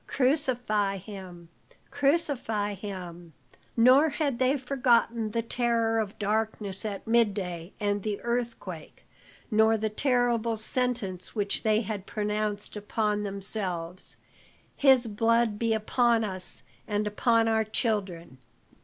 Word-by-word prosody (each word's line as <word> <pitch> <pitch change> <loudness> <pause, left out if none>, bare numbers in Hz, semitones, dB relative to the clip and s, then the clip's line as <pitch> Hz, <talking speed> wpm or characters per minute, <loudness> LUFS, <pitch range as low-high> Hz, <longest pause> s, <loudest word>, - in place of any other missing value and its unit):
Crucify 245 -8 +1
him 185 -3 -10 0.4
crucify 275 -8 0
him!" 180 -4 -8 0.4
Nor 260 +7 +6
had 285 -5 -1
they 260 +2 +3
forgotten 245 -4 +1
the 230 +2 -1
terror 230 -1 +1
of 210 -2 -3
darkness 210 -2 -1
at 200 -2 -4
midday 200 -7 0
and 205 -1 0
the 205 0 -3
earthquake, 235 -9 -4 0.5
nor 220 +1 +4
the 220 0 -2
terrible 240 -2 +1
sentence 220 -5 -2
which 205 -2 0
they 215 0 +2
had 205 -3 -5
pronounced 210 -1 -2
upon 210 0 -1
themselves: 190 -3 -3 0.6
"His 265 -3 +5
blood 225 0 +1
be 230 -1 +1
upon 225 +1 +2
us 185 -3 -5 0.2
and 210 0 0
upon 225 +2 +2
our 220 0 +2
children." 195 - -2
215 Hz, 115 wpm, -28 LUFS, 200-235 Hz, 0.6 s, Nor